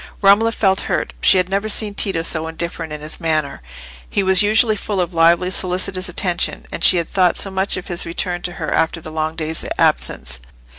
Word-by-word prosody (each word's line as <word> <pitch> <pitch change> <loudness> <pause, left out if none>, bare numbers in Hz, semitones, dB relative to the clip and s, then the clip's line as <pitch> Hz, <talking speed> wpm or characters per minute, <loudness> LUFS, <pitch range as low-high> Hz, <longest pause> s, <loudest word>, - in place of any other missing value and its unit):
Romola 205 +3 +4
felt 195 -4 +1
hurt. - - -1
She - - +5
had 180 -1 +1
never 200 +3 -2
seen 210 -1 +1
Tito 190 -5 -1
so 160 -1 +1
indifferent 165 0 -5
in 150 0 -6
his 155 +1 -5
manner; 155 - -1 0.5
he 200 - 0
was 190 -1 +4
usually 215 +1 +3
full 205 -1 -4
of 175 0 -1
lively 170 +2 +3
solicitous 185 0 -2
attention. 175 0 -2
And - - -6
she 180 - +6
had 170 - -1
thought 180 -2 +1
so 195 - 0
much 190 +1 0
of 185 - -6
his 175 -1 -1
return 175 +1 -3
to 175 - -3
her 155 -3 -5
after 165 +1 0
the 155 -1 -10
long 155 0 -3
day's 160 0 -3
absence! 60 0 +1
180 Hz, 205 wpm, -19 LUFS, 160-195 Hz, 0.5 s, she